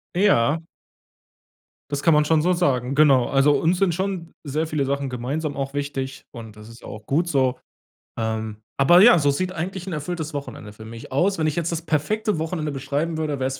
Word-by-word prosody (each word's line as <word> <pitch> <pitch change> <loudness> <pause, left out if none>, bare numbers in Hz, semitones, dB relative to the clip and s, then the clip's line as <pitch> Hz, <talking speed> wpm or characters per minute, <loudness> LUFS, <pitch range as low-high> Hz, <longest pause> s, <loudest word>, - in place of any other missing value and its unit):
Ja. 165 - +3 1.3
Das 145 -1 -2
kann 165 - +5
man 150 0 +4
schon 155 0 +3
so 180 +3 +2
sagen. 135 -6 0
Genau, 140 -4 +5
also, 140 +1 +3
uns 170 +3 +1
sind 190 -4 +2
schon 185 -2 -3
sehr 155 +2 -2
viele 150 -3 -1
Sachen 140 0 -2
gemeinsam 140 +5 -3
auch 135 0 -4
wichtig, 140 -2 -4
und 115 -3 -10
das 105 +1 -13
ist 115 +1 -14
ja - - -11
auch 105 0 -9
gut 165 +5 0
so. 130 -5 +1 0.6
Ähm, 110 -1 -3 0.2
aber 175 +6 +6
ja, 210 -5 +8
so 145 -2 +2
sieht 180 +6 -1
eigentlich 185 +1 -5
'n 180 - -4
erfülltes 160 +1 -4
Wochenende 130 -7 -7
für 110 +1 -12
mich 115 +2 -10
aus. 175 +9 +1
Wenn 155 - 0
ich 150 - -1
jetzt 170 0 -1
das 170 -1 -3
perfekte 175 +5 -1
Wochenende 160 -1 -3
beschreiben 145 +4 -2
würde, 150 -3 -2
wär's 135 0 -2
145 Hz, 205 wpm, -23 LUFS, 135-165 Hz, 1.3 s, ja